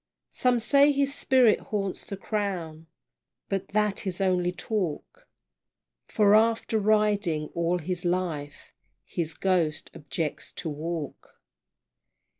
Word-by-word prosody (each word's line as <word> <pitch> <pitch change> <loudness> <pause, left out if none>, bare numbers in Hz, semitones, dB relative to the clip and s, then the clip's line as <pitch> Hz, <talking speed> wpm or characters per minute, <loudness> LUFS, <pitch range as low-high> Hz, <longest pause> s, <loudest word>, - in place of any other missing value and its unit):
Some 250 -1 +2
say 280 +5 +5
his 280 0 +1
spirit 255 -6 +4
haunts 195 -3 -3
the 200 - -6
Crown, 180 -7 -3 0.6
But 195 -2 -2
that 210 0 0
is 185 0 -3
only 180 -2 +1
talk 210 - -4 0.8
For 205 -2 +3
after 225 0 +3
riding 205 -7 +1
all 170 +1 0
his 180 +2 -4
life, 170 -5 -3 0.3
His 165 -2 -4
ghost 170 -5 0
objects 150 +1 -4
to 165 - -4
walk! 155 0 -6
190 Hz, 110 wpm, -27 LUFS, 165-215 Hz, 0.8 s, say